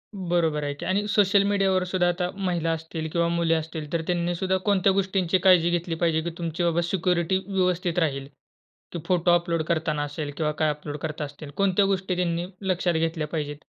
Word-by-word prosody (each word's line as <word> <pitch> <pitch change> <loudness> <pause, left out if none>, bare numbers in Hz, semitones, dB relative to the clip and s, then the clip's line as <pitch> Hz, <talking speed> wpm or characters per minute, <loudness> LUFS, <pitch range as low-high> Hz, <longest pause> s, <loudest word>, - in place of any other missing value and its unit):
बरोबर 170 -5 0
आहे 145 0 -2
की. 145 - -8
आणि 200 +2 0
सोशल 200 -1 +4
मीडियावर 195 -2 +2
सुद्धा 185 -1 +1
आता 175 0 0
महिला 175 -4 -1
असतील 160 0 -5
किंवा 170 0 +1
मुली 170 -1 +1
असतील, 160 -1 -3
तर 165 - +1
त्यांनी 175 0 0
सुद्धा 190 +2 0
कोणत्या 200 -2 +3
गोष्टींची 190 -2 +1
काळजी 175 -2 +6
घेतली 175 -1 -1
पाहिजे? 165 -1 +1
की 170 - -3
तुमची 170 0 -3
बाबा 170 0 +2
सिक्युरिटी 175 +1 +1
व्यवस्थित 180 -2 0
राहील, 140 -4 -1 0.7
की 170 - -3
फोटो 180 -1 +3
अपलोड 170 -1 +1
करताना 160 -2 0
असेल 145 0 -5
किंवा 155 -2 0
काय 155 - +3
अपलोड 150 0 -6
करता 155 0 -4
असतील 145 +1 -10
कोणत्या 195 0 +3
गोष्टी 190 -1 0
त्यांनी 175 -1 -1 0.3
लक्षात 175 0 0
घेतल्या 160 -1 -1
पाहिजेत? 150 -2 -4
170 Hz, 190 wpm, -25 LUFS, 160-185 Hz, 0.7 s, काळजी